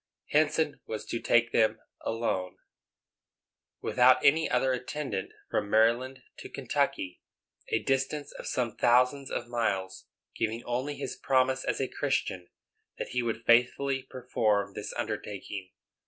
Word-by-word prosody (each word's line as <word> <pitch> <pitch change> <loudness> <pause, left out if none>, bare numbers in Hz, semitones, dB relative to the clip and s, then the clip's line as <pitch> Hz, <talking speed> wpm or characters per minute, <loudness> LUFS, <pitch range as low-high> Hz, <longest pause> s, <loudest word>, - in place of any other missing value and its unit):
Henson 155 0 +2
was 110 -1 -4
to 115 - -3
take 120 0 +3
them 110 -1 +3 0.2
alone, 105 -5 -2 1.2
without 130 +1 +4
any 160 +3 +5
other 130 +1 +2
attendant, 125 -5 -3 0.2
from 100 - 0
Maryland 120 +4 +2 0.2
to - - -8
Kentucky, 90 -1 -1 0.5
a - - 0
distance 135 +2 -1
of - - -8
some 120 -4 -1
thousands 125 +3 +3
of 120 - -3
miles, 100 -6 -2 0.3
giving 115 +1 -2
only 130 +4 -2
his - - -5
promise 130 0 +2
as - - -1
a 135 - 0
Christian 95 -12 -2 0.5
that - - -4
he 125 - 0
would 115 -1 -3
faithfully 130 +3 +3
perform 110 -6 0
this - - -5
undertaking. 100 -2 -4
120 Hz, 130 wpm, -29 LUFS, 110-130 Hz, 1.2 s, any